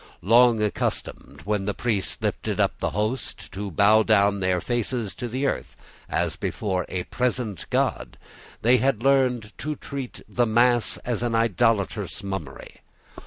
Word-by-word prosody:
Long 115 +2 +5
accustomed, 105 - -3
when 105 -1 -1
the 105 - -2
priest 110 -6 -1
lifted - - -2
up - - +1
the - - 0
host, 110 +7 -3
to 100 +1 -5
bow 105 +4 +5
down 105 -2 +4
with 100 - -5
their 95 -1 +1
faces 120 -1 -2
to 120 - -5
the 130 +4 -2
earth, - - -2 0.3
as - - 0
before 95 -4 -2
a 90 -1 -2
present 125 -5 -2
God, - - -1 0.5
they 120 +3 +5
had 120 -2 0
learned 125 -5 +2
to 150 0 -3
treat 135 -3 -7
the 120 -1 +1
mass 120 +1 +3
as 120 -3 -1
an 120 -1 0
idolatrous 105 -2 +1
mummery. 95 -9 -6
110 Hz, 155 wpm, -24 LUFS, 100-125 Hz, 0.5 s, Long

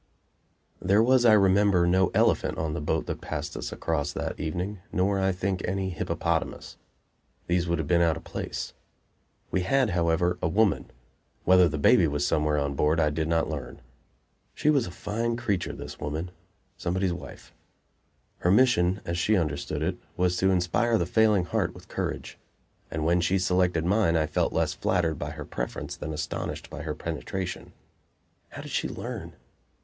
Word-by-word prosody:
IV - - -7
There 100 +4 +5
was, 125 0 +4
I 115 - +7
remember, 100 -2 +4
no 95 +1 +3
elephant - - +2
on 80 -1 -2
the 85 - -3
boat 75 - -1
that - - -5
passed - - -4
us - - -5
across 75 -3 -2
that - - -4
evening, 90 +6 -3
nor, 95 +2 +1
I 95 0 +2
think, 95 0 -2
any 95 0 -1
hippopotamus. 85 - -2 0.7
These 85 0 +1
would 85 0 +1
have 80 - -3
been 85 +1 +3
out 80 -2 +3
of - - -10
place. - - -5 0.8
We 95 - +1
had, 125 +4 +2
however, 85 0 +1
a - - +1
woman. 100 +4 +2 0.5
Whether 90 -1 +6
the 75 - -3
baby 80 +3 +5
was 75 0 -1
somewhere 75 -1 +1
on 70 -1 0
board 75 +4 +2
I 75 -2 +3
did 80 +1 -1
not 80 0 +1
learn. 75 -5 -6 0.8
She 150 - +3
was 140 -8 +2
a - - -7
fine 115 +6 -2
creature, 105 -7 -1
this - - -8
woman; 80 +4 -4 0.5
somebody's 95 +1 0
wife. 90 - -10 0.9
Her 90 - +1
mission, 100 -4 +4
as 85 +1 -2
she 105 +3 +3
understood 75 -5 -2
it, - - -1 0.2
was 90 0 +2
to 95 +1 +3
inspire 95 +6 +2
the 85 - 0
failing 105 -1 +3
heart - - -1
with - - -13
courage; - - -4 0.5
and 80 -1 -3
when 85 +2 +3
she 95 +2 +2
selected 90 -2 +1
mine 95 -2 +3
I 80 - +2
felt - - 0
less - - 0
flattered 85 -5 0
by 75 - -3
her 75 -1 -7
preference 60 - -5
than 80 - -6
astonished 75 0 -4
by 75 -1 -6
her 75 -1 -4
penetration. 85 +4 -5 0.8
How - - -8
did - - -9
she - - -1
learn? - - -6
90 Hz, 175 wpm, -27 LUFS, 80-95 Hz, 0.9 s, I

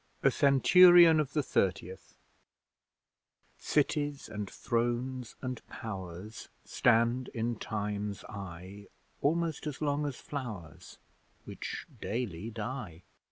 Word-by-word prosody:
A - - +5
CENTURION 170 +4 +7
OF 145 -3 -1
THE 150 - +1
THIRTIETH 95 -5 -2 1.4
Cities 145 -1 0
and 105 -2 -5
Thrones 120 +1 -2
and 125 -2 -4
Powers 95 0 -7 0.2
Stand 120 +1 +2
in 115 +1 -1
Time's 105 -1 -4
eye, 100 0 -9 0.3
Almost 160 0 0
as 150 - -5
long 145 -1 0
as 140 - -4
flowers, 110 - -7 0.5
Which - - -6
daily 110 -3 -3
die. 110 -6 -6
120 Hz, 100 wpm, -31 LUFS, 100-140 Hz, 1.4 s, CENTURION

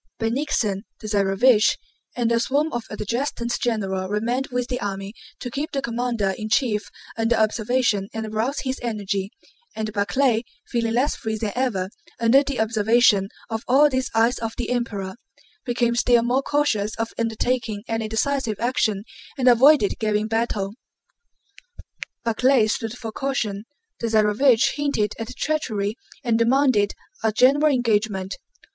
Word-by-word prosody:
Bennigsen, 225 -4 0 0.2
the 215 - -7
Tsarévich, 210 +3 +3 0.4
and 235 -1 0
a 230 - +3
swarm 285 +6 0
of 240 -1 -3
adjutants 235 +3 -2
general 195 -5 -1
remained 235 +6 -1
with 250 -1 -2
the 250 -1 -3
army 195 0 -4 0.3
to 245 - -6
keep 290 +5 -3
the 275 - 0
commander 235 -4 -1
in 215 0 -4
chief 220 -4 +1 0.3
under 225 +1 +1
observation 220 -2 +1
and 225 0 -4
arouse 220 +6 -2
his 260 -1 -3
energy, 200 -4 -2 0.5
and 215 -1 -3
Barclay, 230 +3 +1 0.2
feeling 230 -2 -1
less 265 +4 +1
free 220 0 -3
than 215 -1 -2
ever 210 -7 -1 0.3
under 235 +4 +5
the 275 -3 -4
observation 220 -2 +3 0.2
of 225 0 -3
all 285 +4 +5
these 260 -1 -1
"eyes 230 +3 +3
of 225 -1 -4
the 245 - -3
Emperor," 210 -5 -3 0.5
became 240 -1 +1
still 240 -1 +3
more 250 +3 +1
cautious 250 -8 0
of 225 0 -3
undertaking 230 -1 -1
any 225 -1 -2
decisive 225 0 -1
action 220 -4 0 0.3
and 255 -1 +1
avoided 250 -1 +5
giving 215 -1 0
battle. 220 -3 -1 1.5
Barclay 235 +1 +3
stood 225 +2 -2
for 225 -3 -6
caution. 220 -5 -2 0.3
The 235 - -1
Tsarévich 220 +3 +3
hinted 280 -8 0
at 225 - -6
treachery 220 -9 -1 0.3
and 230 -3 +1
demanded 240 -4 +3 0.3
a 220 - +3
general 280 +7 +4
engagement. 210 -6 0
230 Hz, 145 wpm, -23 LUFS, 215-250 Hz, 1.5 s, under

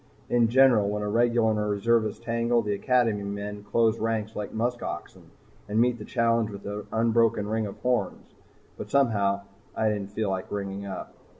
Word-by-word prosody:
In 120 -1 +4
general 120 -4 +5
when 105 0 -2
a - - -2
regular 115 +1 +2
and 105 -1 -1
reservist 110 +1 +1
tangle, 115 0 +1
the 105 -1 -1
Academy 115 -1 +1
men 100 +1 -5
close 115 +1 +2
ranks 110 -1 -2
like 105 -1 -4
musk 120 +2 -1
oxen - - -7 0.4
and 105 +2 +1
meet 120 0 +2
the 105 - -7
challenge 115 -2 +1
with 100 -1 -9
an 105 +1 -5
unbroken 115 -2 +2
ring 110 0 -1
of 100 - -9
horns. 125 -7 -1 0.5
But - - -6
somehow 100 -8 +2 0.3
I 110 - +2
didn't 100 -2 -3
feel 105 -1 -2
like 95 -1 -3
ringing 100 0 -4
up. 95 - -7
110 Hz, 180 wpm, -26 LUFS, 105-115 Hz, 0.5 s, general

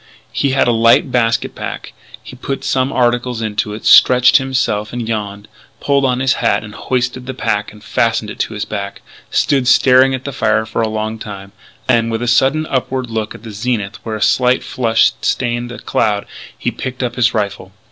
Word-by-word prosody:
He 140 - 0
had 135 -1 +2
a - - +4
light 115 +3 +3
basket 115 -2 +1
pack. - - -7 0.3
He - - -11
put 135 +2 -5
some 135 -1 0
articles 120 -1 0
into 105 -1 -2
it, 110 - -10
stretched 125 0 +6
himself 130 -6 -1
and 120 -2 -4
yawned, 105 -2 -4 0.3
pulled 140 -1 +1
on 125 -1 0
his 130 0 +3
hat, - - +1
hoisted 125 +4 -3
the 130 - -5
pack 105 -4 -2
and 105 0 -16
fastened 115 -2 0
it - - -11
to 110 - -2
his 105 - -3
back, 100 -1 -6 0.3
stood 135 -3 +1
staring 130 +1 +5
at 130 - -7
the 140 - -5
fire 110 -3 +1
for 110 +1 -3
a 110 - 0
long 110 +1 -3
time; 100 -2 -8 0.3
then, 115 -2 +2
with 115 +1 -2
a - - -2
sudden 135 +6 +2
upward 130 -3 -2
look 110 -1 -3
at - - -13
the 115 - -8
zenith 105 -1 -3
where 110 -1 -4
a 110 - -1
slight 125 +3 +2
flush 115 -3 +2
stained 120 -1 -1
a 120 - -7
cloud, 105 -2 -1 0.3
he - - -2
picked 130 0 -5
up 120 -2 -2
his 125 -1 +2
rifle. 100 -3 -3
120 Hz, 200 wpm, -16 LUFS, 110-130 Hz, 0.3 s, stretched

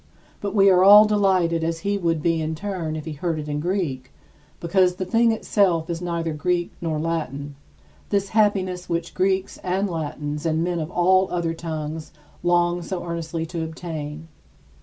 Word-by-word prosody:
But 200 0 -4
we 200 -1 +6
are 180 0 +5
as 205 +2 +9
delighted 190 -6 +2
as 165 0 -2
he 200 +2 0
would 165 -4 0
be 165 -1 +1
in 160 0 -2
turn 170 -3 -4
if 155 - -6
he 160 - -5
heard 160 +2 -2
it 150 -1 -5
in 145 0 -2
Greek, 150 -7 -2 0.5
because 180 +1 +2
the 185 - -3
thing 230 +4 +3
itself 180 -7 +1
is 170 0 -4
neither 170 -2 -2
Greek 175 +3 -1
nor 160 -2 -1
Latin, 150 -3 -3 0.6
this 200 -1 0
happiness 190 -4 +1
which 170 0 -2
Greeks 190 0 0
and 190 +2 -1
Latins 150 -3 -4
and 160 0 +1
men 175 -1 -1
of 155 0 -4
all 185 +2 +3
the - - -9
other 170 -2 -1
tongues 160 -1 -5 0.3
long 175 0 +2
so 175 +1 -4
earnestly 165 -1 -3
to 165 0 -4
obtain. 160 -1 -6
170 Hz, 180 wpm, -23 LUFS, 160-185 Hz, 0.6 s, as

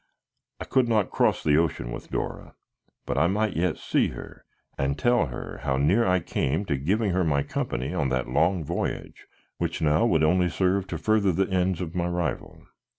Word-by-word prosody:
I - - -5
could 130 -2 +2
not 110 -4 +1
cross - - +1
the 75 -1 +3
ocean 80 -7 0
with - - -8
Dora, - - -5 0.5
but - - -1
I 85 - +4
might 105 +2 0
yet 85 0 0
see - - +1
her - - -10 0.3
and 70 +1 -1
tell 120 - +2
her 65 - -7
how 65 -1 0
near 95 - +3
I 90 0 +2
came 75 +5 -1
to 75 - 0
giving 95 +10 0
her 90 +1 +1
my 70 -4 +1
company 65 +2 -3
on 70 - 0
that 65 -1 -1
long 85 +1 +1
voyage - - -4 0.3
which - - -2
now 75 +7 +3
would 80 -7 +2
only 90 +3 +3
serve 95 +2 0
to 85 - -4
further 105 +2 +2
the 95 +3 0
ends 95 -1 +1
of 85 -2 -5
my 85 -1 -1
rival. 85 -5 -3
85 Hz, 195 wpm, -26 LUFS, 75-95 Hz, 0.5 s, I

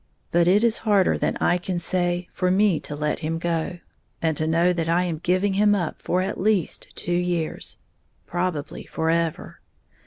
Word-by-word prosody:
But 170 0 +3
it 200 +5 +4
is 230 -1 +3
harder 205 -4 +3
than - - -1
I 175 - +2
can 180 0 -3
say 175 0 0
for 185 -1 0
me 190 -2 +3
to 145 - -6
let 150 0 -1
him 165 0 -2
go, 170 +1 -2 0.4
and 160 -2 0
to 155 +2 -1
know 170 +2 +3
that 165 -2 -2
I 175 +2 +3
am 170 -4 -2
giving 185 +4 +1
him 205 +1 +4
up 175 -5 -3
for 180 +1 0
at 195 0 -3
least 200 -5 0
two 175 - -2
years, 175 -2 -1 0.5
probably 175 -4 -3
forever. 165 0 -1
175 Hz, 180 wpm, -24 LUFS, 165-185 Hz, 0.5 s, it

